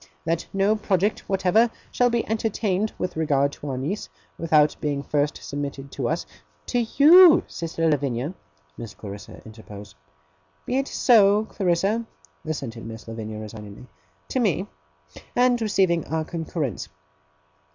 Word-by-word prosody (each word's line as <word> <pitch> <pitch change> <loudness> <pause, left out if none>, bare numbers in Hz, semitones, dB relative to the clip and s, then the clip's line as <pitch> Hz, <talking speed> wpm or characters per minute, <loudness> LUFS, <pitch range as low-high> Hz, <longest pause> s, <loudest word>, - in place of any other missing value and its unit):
That 165 0 -1
no 195 +2 +2
project 200 -1 0
whatever 195 +4 +3 0.2
shall 245 0 +3
be 235 -1 -1
entertained 215 -2 -1
with 180 - -3
regard 140 -3 +1
to 145 - -8
our 130 - -3
niece, 155 +11 -4 0.3
without 155 -2 +3
being 145 -2 -2
first 145 0 0
submitted 140 -1 -5
to 130 -4 -2
us 165 +2 -2 0.2
' - - -38
'To 245 - 0 0.2
you, 335 +3 +8
sister 165 0 -3
Lavinia,' 140 0 -1 0.5
Miss 115 -2 -8
Clarissa 100 -1 -10
interposed. 105 -2 -11 0.7
'Be 255 - 0
it 275 - -2
so, 210 -3 +4
Clarissa!' 195 +3 0 0.4
assented 130 -7 -5
Miss 110 0 -9
Lavinia 110 -1 -6
resignedly 105 +1 -9 0.4
'to 260 - -1
me 200 -4 +1 0.7
and 245 -1 +3
receiving 190 -6 +2
our 160 0 -2
concurrence. 160 - -4
165 Hz, 135 wpm, -24 LUFS, 135-210 Hz, 0.7 s, you